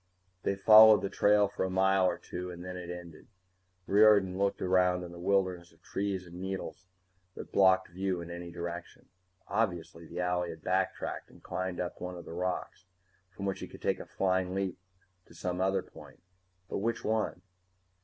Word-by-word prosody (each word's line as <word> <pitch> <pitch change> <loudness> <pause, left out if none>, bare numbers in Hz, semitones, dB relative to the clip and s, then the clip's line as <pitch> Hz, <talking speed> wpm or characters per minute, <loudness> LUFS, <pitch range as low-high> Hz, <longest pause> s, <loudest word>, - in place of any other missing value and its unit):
They 100 - 0
followed 110 +2 +8
the 100 - -2
trail 105 0 +4
for 100 - -3
a 95 - -1
mile 95 0 +3
or - - 0
two 90 +1 -6
and 90 0 -8
then 90 0 -6
it 90 -1 -7
ended. 85 -3 -9 0.6
Riordan 100 -2 +5
looked 100 +1 0
around 90 -1 +2
the 85 -1 -8
wilderness 90 -2 0
of - - -27
trees 95 -2 -3
and 90 +1 -10
needles 95 -1 -5 0.5
which - - -9
blocked 95 -1 +4
view 95 +1 -2
in 85 0 -7
any 85 0 -7
direction. 85 0 -7 0.4
Obviously 90 -6 -2
the 85 - -9
owlie 90 -1 0
had 80 -1 -9
backtracked - - -1
and - - -19
climbed 95 -1 -3
up 90 -1 -4
one 90 0 -5
of 85 - -10
those - - -8
rocks, 90 +1 -3 0.4
from 100 - -7
which 95 -1 -2
he - - -6
could - - -14
take - - +1
a - - -8
flying 95 -1 0
leap 95 -2 -2 0.5
to 85 - -17
some 90 +1 -3
other 95 +1 +1
point. - - -15 0.4
But - - -3
which 115 +3 -1
one? 110 0 -1
95 Hz, 185 wpm, -31 LUFS, 90-95 Hz, 0.6 s, followed